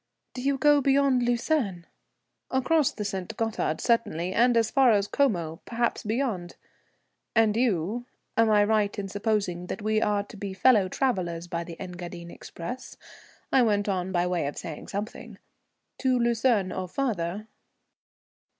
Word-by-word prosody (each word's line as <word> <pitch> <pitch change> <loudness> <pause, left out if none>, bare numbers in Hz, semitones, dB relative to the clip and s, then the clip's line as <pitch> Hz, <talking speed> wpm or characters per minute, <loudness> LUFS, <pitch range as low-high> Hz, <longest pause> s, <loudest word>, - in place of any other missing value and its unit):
"Do 250 - -6
you 275 +1 +1
go 290 +1 +5
beyond 275 -1 +3
Lucerne?" 240 - 0 0.6
"Across 275 +3 +2
the 210 - -5
St. 200 +1 -4
Gothard 225 -8 -1
certainly, 185 -7 0
and 240 +1 +4
as 225 -1 +2
far 265 -2 +5
as 200 -1 +2
Como, 175 - 0
perhaps 235 0 -1
beyond. 215 -6 -2 0.8
And 220 -2 +4
you? 230 0 0 0.3
Am 225 -1 +4
I 210 -1 +5
right 210 -1 +1
in 200 -1 -3
supposing 200 -4 -1
we 215 0 +1
are 205 -2 +1
to 210 - -13
be 195 -1 -5
fellow 210 -2 +4
travellers 180 -10 -1
by 170 0 -3
the 170 -1 -10
Engadine 175 -1 -7
express?" 245 +10 -8 0.5
I 265 - +5
went 205 -3 +2
on 190 -2 -1
by 175 -1 +1
way 180 -5 0
of 145 - -5
saying 160 -3 -7
something. 205 +3 -6 0.6
"To 260 -1 +2
Lucerne 235 -4 +2
or 185 -1 -4
further?" 205 -3 -2
210 Hz, 150 wpm, -27 LUFS, 180-245 Hz, 0.8 s, go